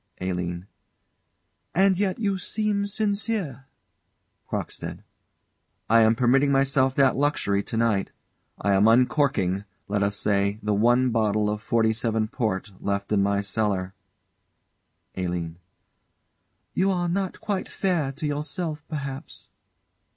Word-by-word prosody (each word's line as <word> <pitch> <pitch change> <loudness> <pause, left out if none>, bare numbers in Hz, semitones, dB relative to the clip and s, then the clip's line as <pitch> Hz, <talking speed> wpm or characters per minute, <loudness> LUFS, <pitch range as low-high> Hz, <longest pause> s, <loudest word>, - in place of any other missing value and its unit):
ALINE. 90 -1 -3 1.1
And 190 +1 +5
yet 195 -2 0
you 200 -4 -1
seem 205 0 0
sincere. 200 - -2 0.8
CROCKSTEAD. - - -5 0.9
I 115 0 +7
am 110 +1 +5
permitting 135 +4 +3
myself 135 -1 +2
that 135 -2 +4
luxury 135 -8 +1
to 110 - -5
night. 110 -4 +1 0.5
I 100 0 +1
am 100 +2 +5
uncorking, 120 -5 +2 0.2
let 100 0 0
us 100 +1 +1
say, 100 0 +1
the 105 0 +1
one 120 +4 +3
bottle 105 -2 +1
of 105 0 -4
'47 110 0 +1
port 110 -5 -2
left 100 0 -2
in 105 -2 +3
my 100 0 +1
cellar. 100 -2 -1 1.2
ALINE. 85 -2 -3 1.1
You 190 +1 +2
are 175 -2 0
not 190 +2 -2
quite 200 -3 -3
fair 170 -8 0
to 155 +3 -5
yourself, 150 +2 -2
perhaps. 140 -3 -6
115 Hz, 120 wpm, -25 LUFS, 100-155 Hz, 1.2 s, I